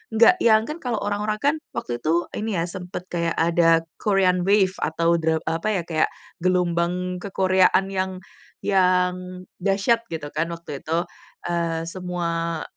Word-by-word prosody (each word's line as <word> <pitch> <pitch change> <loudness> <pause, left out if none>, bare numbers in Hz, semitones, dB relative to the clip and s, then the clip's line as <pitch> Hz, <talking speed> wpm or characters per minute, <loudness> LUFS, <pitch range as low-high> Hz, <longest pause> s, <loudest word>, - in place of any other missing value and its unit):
nggak 235 +12 +6
yang, 220 -6 +5
kan 300 +8 -6
kalau 245 -6 -2
orang-orang 210 +1 -1
kan 285 +2 +3 0.2
waktu 120 0 -3
itu 165 +6 +1 0.2
ini 215 -1 -2
ya 165 - +1
sempet 180 -1 -6
kayak 170 -1 -1
ada 165 0 +3 0.2
Korean 185 -3 +2
wave 200 -2 +4
atau 170 +2 +1
dra 160 0 +1
apa 165 +5 -2
ya, 180 - -1
kayak 160 -2 +1 0.3
gelombang 180 0 0
ke-Korea-an 190 0 +2
yang 190 -1 -1 0.5
yang 180 -1 +1 0.2
dahsyat 195 +5 +2
gitu 160 -3 -5
kan, 165 +2 0
waktu 165 -4 -8
itu. 165 +2 0 0.5
Eee, 165 -1 -1
semua, 170 -2 -3
180 Hz, 145 wpm, -23 LUFS, 165-195 Hz, 0.5 s, nggak